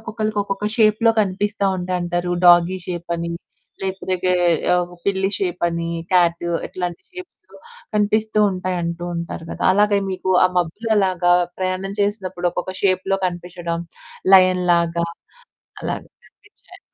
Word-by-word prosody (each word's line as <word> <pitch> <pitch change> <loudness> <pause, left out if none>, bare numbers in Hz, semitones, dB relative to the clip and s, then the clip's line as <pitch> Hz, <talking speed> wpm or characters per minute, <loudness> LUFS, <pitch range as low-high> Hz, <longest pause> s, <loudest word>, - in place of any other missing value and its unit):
ఒక్కొక్కళ్ళకి 215 -1 -3
ఒక్కొక్క 195 0 -4
షేప్‌లో 220 +1 +4
కనిపిస్తా 200 +1 -1
ఉంటాయంటారు. 180 -1 -2 0.2
డాగీ 175 +1 +6
షేప్ 175 -1 -5
అని 170 0 -4 0.5
లేకపోతే 190 -1 -2 0.9
పిల్లి 195 -1 +1
షేపని, 170 -3 -1 0.2
క్యాట్ 170 -2 +3 0.2
ఇట్లాంటి 180 -1 -5
షేప్స్‌లొ 365 0 -12 0.4
కనిపిస్తూ 215 +1 +2
ఉంటాయంటూ 175 -2 -3
ఉంటారు 170 -1 -6
కదా! - - -6
అలాగే 205 +1 +3
మీకు 185 0 -3
ఆ - - +7
మబ్బులు 190 +7 -3
అలాగా 185 -3 +2 0.3
ప్రయాణం 185 +1 -2
చేసినప్పుడు 190 -3 -1
ఒక్కొక్క 185 +1 -4
షేప్‌లో 190 0 +1
కనిపించడం, 175 -1 -5 0.5
లయన్ 185 -1 +5
లాగా 170 0 +1 0.8
అలాగా - - -4 0.2
కనిపించాయా? - - -20
185 Hz, 115 wpm, -20 LUFS, 175-200 Hz, 0.9 s, ఆ